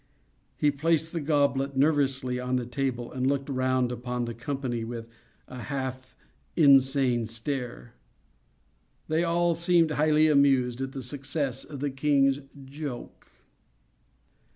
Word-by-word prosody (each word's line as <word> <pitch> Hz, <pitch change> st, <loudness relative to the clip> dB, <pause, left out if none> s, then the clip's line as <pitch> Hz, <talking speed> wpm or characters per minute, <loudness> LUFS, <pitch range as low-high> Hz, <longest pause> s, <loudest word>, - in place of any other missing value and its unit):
He 150 Hz, -, +3 dB
placed 160 Hz, +2 st, 0 dB
the 170 Hz, -, -3 dB
goblet 140 Hz, -2 st, +1 dB
nervously 135 Hz, -3 st, +2 dB
on 125 Hz, 0 st, -1 dB
the 125 Hz, -1 st, -1 dB
table, 125 Hz, -1 st, -3 dB
and 130 Hz, 0 st, -1 dB
looked 140 Hz, 0 st, 0 dB
round 130 Hz, -2 st, +1 dB
upon 125 Hz, 0 st, -3 dB
the 120 Hz, -, -5 dB
company 125 Hz, -1 st, -3 dB
with 115 Hz, 0 st, -6 dB, 0.4 s
a 125 Hz, -1 st, -8 dB
half 130 Hz, -2 st, -5 dB, 0.4 s
insane 135 Hz, -5 st, +4 dB
stare. 115 Hz, -, -5 dB, 1.1 s
They 160 Hz, +2 st, +1 dB
all 170 Hz, 0 st, +2 dB
seemed 170 Hz, -1 st, +3 dB
highly 155 Hz, +1 st, +3 dB
amused 135 Hz, -4 st, +3 dB
at 135 Hz, 0 st, -4 dB
the 135 Hz, -, -6 dB
success 135 Hz, 0 st, -3 dB
of 140 Hz, -3 st, -9 dB
the 145 Hz, -1 st, -1 dB
king's 135 Hz, 0 st, +2 dB, 0.3 s
'joke. 140 Hz, -2 st, -7 dB
135 Hz, 130 wpm, -27 LUFS, 125-145 Hz, 1.1 s, insane